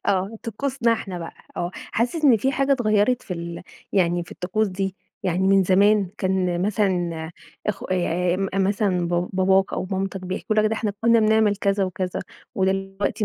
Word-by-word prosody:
آه، 195 +3 0
طقوسنا 235 +1 0
إحنا 195 -5 -4
بَقى 165 -1 -7 0.2
آه، 175 0 -2
حاسس 250 +8 -2
إن 260 -5 +7
في 265 +6 0
حاجة 275 +1 +2
اتغيَّرت 230 -1 +2
في 180 - -5
ال 170 0 -6 0.3
يعني 175 -2 +2
في - - -11
الطقوس 210 +4 -1
دي؟ 190 0 -3 0.3
يعني 190 0 +1
من 195 0 +5
زمان 200 +1 +4
كان 185 -2 0
مثلًا 180 -6 0 0.4
أخو 210 -2 -2
آآ، 180 -1 0 0.2
مثلًا 195 -2 +1
ب 175 +1 0
باباك 190 0 +3
أو - - -2
مامتك 195 0 -2
بيحكوا 185 +4 -3
لك 215 - +4
ده 215 - +2
إحنا 215 -2 -2
كنا 230 0 +5
بنعمل 215 -1 +3
كذا 200 -1 +1
وكذا، 185 0 -3 0.3
ودلوقتي 195 +2 -1
195 Hz, 170 wpm, -23 LUFS, 180-215 Hz, 0.4 s, إن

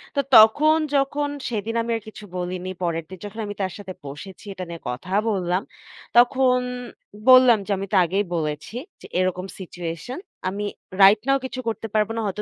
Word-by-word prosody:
তো - - +1 0.2
তখন 285 +9 +7 0.2
যখন 285 +1 +1 0.2
সেদিন 225 0 -3
আমি 230 +1 -3
আর - - -9
কিছু 215 - -10
বলিনি। 180 +1 -4
পরেরদিন 170 +1 -3
যখন 205 +2 -8
আমি 205 - -4
তার 190 -1 -1
সাথে 195 -2 -8
বসেছি 185 +9 -9
এটা 185 - -6
নিয়ে 170 -1 -7
কথা 125 +9 -6 0.2
বললাম। 185 -3 0 0.6
তখন 250 +1 +5 0.7
বললাম 255 -2 +8
যে, 210 - -4
"আমি 195 +1 -4
তা - - +5
আগেই 195 +5 0
বলেছি 150 +5 -3 0.3
যে - - -11
এরকম 185 0 0
সিচুয়েশন 175 - -6 0.3
আমি 200 +2 -4 0.4
রাইট 195 +2 +8
নাও 275 0 +4
কিছু 260 0 -5
করতে 225 0 -2
পারব 215 -1 +2
না। - - -2
হয়তো 205 +1 -3
200 Hz, 175 wpm, -23 LUFS, 180-230 Hz, 0.7 s, বললাম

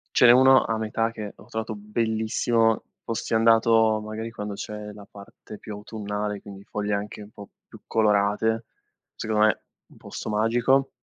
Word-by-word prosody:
ce - - +6
n'è 120 - +9
1 130 +1 +6
a 115 - -1
metà 110 +1 -1
che 105 -3 -7
ho - - -16
trovato 110 0 -4
bellissimo, 110 +1 0 0.2
fossi 115 0 -4
andato 115 -1 +4
magari 110 +1 -6
quando 105 -2 -5
c'è 105 0 -7
la 105 -1 -13
parte 100 +1 -12
più 105 - -8
autunnale, 105 -1 -4
quindi 100 -1 -11
foglie 105 0 -3
anche 105 +1 -4
un 105 - -11
po' 100 - -12 0.2
più - - -14
colorate, 110 +1 +1 0.5
secondo 110 -1 +1
me 110 - +1 0.3
un - - -19
posto - - -7
magico. 120 +5 +2
110 Hz, 165 wpm, -25 LUFS, 105-115 Hz, 0.5 s, n'è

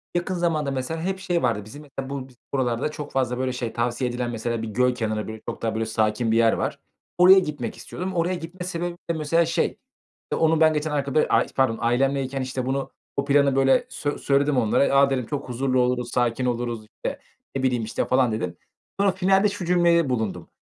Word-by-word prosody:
Yakın 175 +1 -1
zamanda 160 -5 0
mesela 135 +5 -3
hep 190 +2 -2
şey 175 -2 -1
vardı 105 - +1
bizim, 145 +8 -10
mesela 135 -1 -7
bu 135 -2 -5
biz 125 - -20 0.2
buralarda 130 +2 0
çok 150 -1 -7
fazla, 125 -2 0
böyle, 130 -1 -1
şey 120 -3 -4
tavsiye 120 +1 -1
edilen, 120 0 -3
mesela 115 0 -2
bir 115 - -4
göl 125 +3 +1
kenarı, 110 -3 -2
böyle, 110 0 -7
çok - - -6
daha 115 -1 -1
böyle, 110 0 0
sakin 110 +1 0
bir 115 - +3
yer 115 -1 +5
var. - - -2 0.4
Oraya 185 +2 +8
gitmek 145 -8 -4
istiyordum. 185 +1 -5
Oraya 175 +2 +1
gitme 175 +2 -7
sebebim 175 -1 -3
de - - +2
mesela, 160 +2 +2
şey, 165 - +1 0.6
işte, - - -4
onun 160 0 +3
ben 155 0 +6
geçen 150 0 -1
arka 140 -1 -2
böyle, 155 - +4
aaa, - - +4
pardon 130 -4 +2
ailemleyken, 135 +2 +1
işte, 130 0 -3
bunu 135 +1 -2 0.3
bu 140 - 0
planı 140 -1 +3
böyle 135 0 +4
sö 145 -1 -3
söyledim 140 0 +2
onlara. 125 +4 +3
"A!" 140 0 +6
dedim. 130 -3 -1
"Çok 140 -2 -5
huzurlu 130 +1 0
oluruz, 125 -1 0
sakin 120 +1 +1
oluruz." 120 -2 -2
İşte, 105 - -6 0.4
ne 135 - -1
bileyim, 125 -3 +1
işte, 110 - -2
falan 130 -2 +3
dedim. 90 -6 -3 0.4
Sonra 200 -1 +4
finalde 195 +2 +3
şu 200 -3 -5
cümlede 170 -4 +3
bulundum: 100 -8 -2
135 Hz, 210 wpm, -24 LUFS, 120-160 Hz, 0.6 s, Oraya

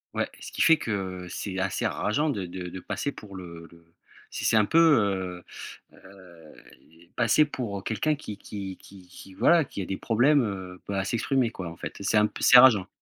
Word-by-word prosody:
Ouais, - - 0
ce - - -9
qui - - 0
fait 165 -1 +6
que 95 -4 -4
c'est 95 0 -5
assez 95 0 -2
rageant 145 +8 0
de 95 -6 -4
de 90 0 -7
de 95 - -8
passer 140 +9 -4
pour 100 -6 -12
le 85 -2 -10
le 85 0 -19 0.5
si - - -6
c'est 110 - +4
un 105 - +4
peu, 165 - 0
heu, 100 - +2 0.5
heu, 90 -5 -16 0.6
passer 120 +6 +3
pour 105 -9 -5
quelqu'un 150 +7 0
qui 105 -8 -8
qui 95 -2 -7
qui 95 -2 -16
qui, 95 +1 -14
voilà, 170 -2 +4
qui 100 - -7
a - - -6
des 95 - -4
problèmes 110 -7 +1
à 95 -1 -1
s'exprimer 125 +2 0
quoi. 90 -6 -7
En 85 - -10
fait - - -7
c'est 105 +2 +1
un 105 - +5
peu - - -6
c'est 125 - +8
rageant. 115 -7 +7
100 Hz, 200 wpm, -26 LUFS, 95-120 Hz, 0.6 s, c'est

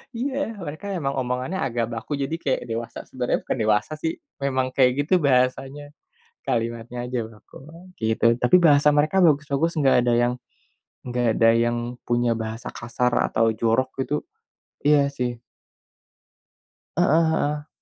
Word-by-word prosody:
Iya. 265 -1 -2
Mereka 170 0 -7
emang 140 -5 -2
omongannya 130 +8 -2
agak 120 -3 -2
baku, 115 +6 -4
jadi 160 +4 -2
kayak 135 -5 -1
dewasa. 115 +1 -4
Sebenarnya 125 -1 -2
bukan - - -2
dewasa, 110 +5 +1
sih, 160 0 -1 0.3
memang 130 -2 -1
kayak 130 -1 +4
gitu 165 - -2
bahasanya. 135 +1 0 0.5
Kalimatnya 115 +1 -3
aja 125 0 -3
baku, 110 -1 -17
ah, 170 +3 -14 0.2
gitu. 110 +1 0
Tapi, 125 +7 +3
bahasa 150 -3 +5
mereka 155 +6 +2
bagus-bagus, 155 0 +2
enggak 140 -3 +4
ada 120 - +2
yang 120 0 +2 0.7
enggak 125 -1 -1
ada 115 0 +5
yang 120 +1 +1 0.3
punya 120 0 +1
bahasa 110 +1 -5
kasar 125 +1 -2 0.2
atau 115 0 +2
jorok 115 +4 +1 0.2
gitu, 140 - -3 0.7
iya, 145 -1 +3
sih. 120 -3 -3 1.6
Heeh 165 -2 +4
heeh. 150 -1 -1
130 Hz, 140 wpm, -23 LUFS, 120-150 Hz, 1.6 s, bahasa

